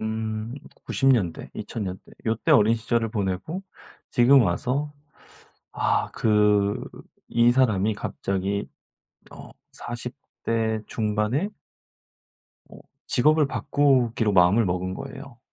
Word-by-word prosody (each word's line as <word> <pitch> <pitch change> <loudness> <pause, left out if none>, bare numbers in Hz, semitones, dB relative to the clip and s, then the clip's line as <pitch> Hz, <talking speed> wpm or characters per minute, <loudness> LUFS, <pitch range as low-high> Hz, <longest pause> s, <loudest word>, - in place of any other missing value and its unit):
음 110 +1 -3 0.3
90 135 - +1
년대 100 -11 +1
2000 115 - -5
년대 95 -1 -5 0.2
요때 110 0 +1
어린 110 +2 +5
시절을 115 0 -1
보내고 105 - -3 0.5
지금 130 +2 +6
와서 125 +10 -1 0.8
아 - - 0
그 105 -2 +2 0.5
이 120 +1 +4
사람이 110 -5 +2
갑자기 100 -1 -3 0.7
어 - - -11 0.2
40 120 +1 -6 0.3
대 110 -1 0
중반에 110 - -1 1.2
어 - - -13 0.3
직업을 150 +3 +3
바꾸기로 125 -7 +1
마음을 95 +5 +5
먹은 90 0 -2
거예요. 135 +1 -9
110 Hz, 190 characters per minute, -24 LUFS, 105-125 Hz, 1.2 s, 지금